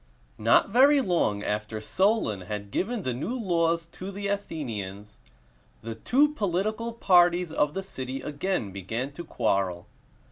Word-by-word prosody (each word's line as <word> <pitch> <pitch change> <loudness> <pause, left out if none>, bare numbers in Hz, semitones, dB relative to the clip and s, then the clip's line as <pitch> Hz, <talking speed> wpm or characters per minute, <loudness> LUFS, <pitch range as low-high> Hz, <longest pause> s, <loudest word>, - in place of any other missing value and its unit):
Not 115 - +4
very 275 +6 +6
long 170 - +1
after 105 +1 -2
Solon 190 - +1
had 100 +1 -6
given 220 - -1
the 130 - -1
new 170 - -3
laws 170 -4 +1
to 185 - -7
the 200 0 -4
Athenians, 105 - -5 0.6
the 115 0 -4
two 260 - +3
political 215 - -1
parties 180 -5 +4
of 150 -2 +1
the 195 - -2
city 130 -7 -5
again 145 - -2
began 110 +8 -4
to 170 +4 -8
quarrel. 95 - -1
165 Hz, 140 wpm, -27 LUFS, -, 0.6 s, very